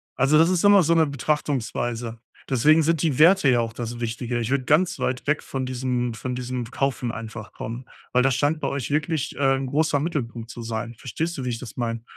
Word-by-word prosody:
Also, 135 +4 +4
das 165 +3 +5
ist 185 0 +1
immer 205 -2 +7
so 165 - +3
'ne 160 -1 +5
Betrachtungsweise. 120 -4 -2 0.3
Deswegen 150 +5 +5
sind 165 -1 +1
die 150 -4 0
Werte 175 -1 +6
ja 120 - +4
auch 115 -1 -2
das 120 0 -5
Wichtige. 120 +1 -3
Ich 115 +1 -2
würde 135 -2 0
ganz 165 +6 +3
weit 125 +1 -2
weg 150 +1 +1
von 135 -1 -4
diesem 125 -2 -2
von 125 +3 -4
diesem 125 -1 -4
Kaufen 135 -3 -1
einfach 110 -1 -8
kommen, 120 +3 -6 0.3
weil 125 0 +3
das 135 -2 +2
scheint 150 +2 +1
bei - - -2
euch 140 -2 -3
wirklich, 155 0 -1
äh, 135 -1 +3
'n 135 0 -3
großer 150 +2 +1
Mittelpunkt 120 -7 -3
zu 120 0 -8
sein. 115 +1 -4
Verstehst 160 +9 -4
du, 130 - -4
wie 125 - -1
ich 115 - -3
das 115 -2 -10
meine? 115 -1 -2
130 Hz, 220 wpm, -24 LUFS, 120-150 Hz, 0.3 s, immer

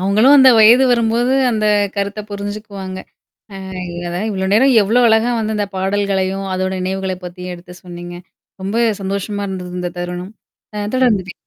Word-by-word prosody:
அவங்களும் 215 +9 +4
அந்த 265 -1 +7
வயது 235 +4 +7
வரும்போது 235 +2 +1 0.2
அந்த 215 -2 0 0.3
கருத்த 200 +1 -2
புரிஞ்சுக்குவாங்க. 200 -2 -6 0.6
அ - - -8 0.4
இல்லதான். 175 +4 -4
இவ்ளோ 190 -1 -2
நேரம் 260 +4 +4
எவ்வளோ 225 +5 +2
அழகா 225 +2 +3
வந்து 220 0 -2
இந்த 205 -1 -1
பாடல்களையும் 195 0 -1
அதோட 185 0 -1
நினைவுகளை 190 0 -3
பத்தியும் 180 0 -7
எடுத்து 175 +1 -13
சொன்னீங்க? 175 -1 -9 0.5
ரொம்ப 200 +4 -2 0.2
சந்தோஷமா 200 +1 -3
இருந்தது 180 -2 -6
இந்த 175 -1 -3
தருணம். 180 +3 -6 0.4
அ 205 0 -3
தொடர்ந்து 230 -8 +2
பே - - -7
200 Hz, 150 wpm, -17 LUFS, 185-220 Hz, 0.6 s, அந்த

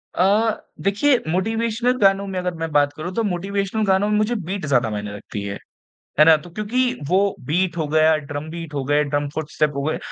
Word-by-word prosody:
अ, 210 +4 +2 0.2
देखिए 225 +8 +3
मोटिवेशनल 225 +6 0
गानों 195 0 +4
में 190 -1 -3
अगर 180 0 -2
मैं 165 - -3
बात 145 -1 +3
करूँ 175 +4 -6
तो 230 - +1
मोटिवेशनल 200 +2 -1
गानों 195 +1 +2
में 210 - +2
मुझे 215 +3 +1
बीट 190 -3 -4
ज़्यादा 125 -6 +2
मायने 105 -1 -5
रखती 100 0 -7
है। 100 0 -4 0.6
है 155 - +8
ना? 160 -1 +8
तो 155 +3 -12
क्योंकि 240 +7 0 0.2
वो 185 +3 +3 0.3
बीट 175 +3 0
हो 160 -2 -1
गया 155 +1 +4 0.2
ड्रम 145 +2 -4
बीट 165 -2 -7
हो 140 - -1
गए 145 +2 +2
ड्रम 145 0 -1
फुट 155 -1 -4
स्टेप 150 -1 +1
हो 140 - -2
गए 155 +3 -1
180 Hz, 215 wpm, -21 LUFS, 150-205 Hz, 0.6 s, है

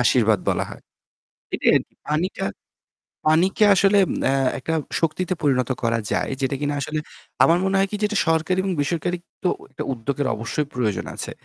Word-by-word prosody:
আশীর্বাদ 115 -4 +4
বলা - - +1
হয়। - - -10 0.7
এটাই - - +3
আর - - +3
কি। - - -35
পানিটা, 160 - -1 0.8
পানিকে 180 +7 +4
আসলে 200 +2 +4 0.3
আ - - +3 0.3
একটা 160 +5 -3 0.3
শক্তিতে 175 +3 0
পরিণত 130 -3 +2
করা 115 -1 +1
যায়। - - 0
যেটা 135 +1 0
কিনা 145 0 -1
আসলে 155 +3 -2 0.4
আমার 170 +2 +5
মনে 195 0 +1
হয় 195 0 +2
কি 210 - -2
যেটা 210 0 0
সরকারি 165 +3 +2
এবং 190 -1 -1
বেসরকারি 170 +4 -1 0.3
তো 180 - +2 0.2
একটা 135 - -5
উদ্যোগের 135 +3 -2
অবশ্যই 115 +7 -2
প্রয়োজন 110 -6 -1
আছে। - - -5
155 Hz, 170 wpm, -23 LUFS, 130-185 Hz, 0.8 s, আমার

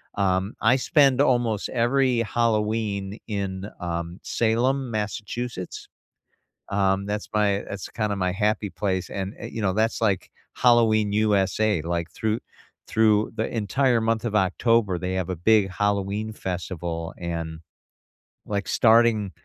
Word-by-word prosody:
um, 95 +1 0
I 120 +4 +5
spend 135 0 +3
almost 120 -6 +1
every 125 0 +2
Halloween 110 -3 -1
in, 100 -2 -3
um, 85 0 -4
Salem, 120 +3 0
Massachusetts. 105 0 -4 0.8
Um, 100 -1 +1
that's 105 0 -3
my 100 -1 +2
that's 100 -1 -6
kinda 105 -2 -2
my 90 -1 0
happy 105 +1 0
place, 95 -3 -2
and, 95 +1 -4
eh, - - -6
you 115 - -4
know, 95 - +2
that's 110 +1 0
like 100 -5 0 0.2
Halloween, 110 -4 +4
USA, 105 -2 +2
like, 85 0 -2
through 110 +1 -1 0.5
through 110 -1 +3
the 110 - -1
entire 120 +3 +2
month 115 0 0
of 105 - -3
October, 105 0 +2
they 95 +1 -3
have 95 -1 -2
a 90 - -2
big 100 +2 +3
Halloween 105 +2 -1
festival, 90 -4 -4
and, 85 -2 -4 0.9
like 100 -1 -3
starting 110 -3 +4
105 Hz, 135 wpm, -24 LUFS, 95-115 Hz, 0.9 s, I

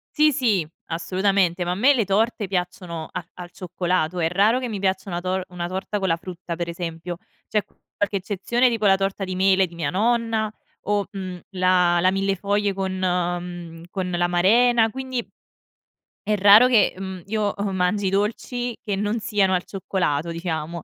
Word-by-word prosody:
Sì 305 0 +5
sì. 215 - +1 0.2
Assolutamente. 185 +1 +1
Ma 175 - -1
a - - -1
me 255 +9 +5
le 240 -5 +2
torte 210 +2 0
piacciono 180 -3 -3
a - - -4
al 175 -1 -9
cioccolato. 180 -2 -1
È 165 - +2
raro 205 +7 +3
che 255 - -3
mi 215 -4 -4
piaccia 190 0 -1
una 175 -1 -3
tor 185 +1 -1
una 175 -1 -4
torta 190 +3 -3
con 190 - -1
la 165 -2 +2
frutta 175 -1 -7
per 170 0 -3
esempio. 170 0 -5 0.3
C'è 210 -2 0
qualche 205 0 -5
eccezione, 210 +6 +1
tipo 225 -3 -1
la 195 0 +5
torta 195 0 -2
di 185 -1 -3
mele 190 0 +3
di 170 - -14
mia 160 -4 -2
nonna 225 +1 +1 0.3
o, 205 -1 0
mhmm, 185 -3 -6
la 180 -2 +3
la 185 +2 +4
millefoglie 200 +1 0
con 190 0 -2
mhmm, 175 -2 -2
con 185 -2 -3
l'amarena; 195 +7 +3
quindi 260 0 -4 1.0
è 210 - +3
raro 205 +4 +8
che, 235 -5 +4
mhmm, 190 -1 -6
io, 210 0 -1
uhm, 200 -1 -2
mangi 190 +2 +1
i - - +2
dolci 230 +4 -1
che 205 -3 -1
non 210 +3 -1
siano 200 -3 +1
al 180 -1 +1
cioccolato 170 -5 -2
diciamo, 165 -1 -4
190 Hz, 180 wpm, -23 LUFS, 175-210 Hz, 1.0 s, raro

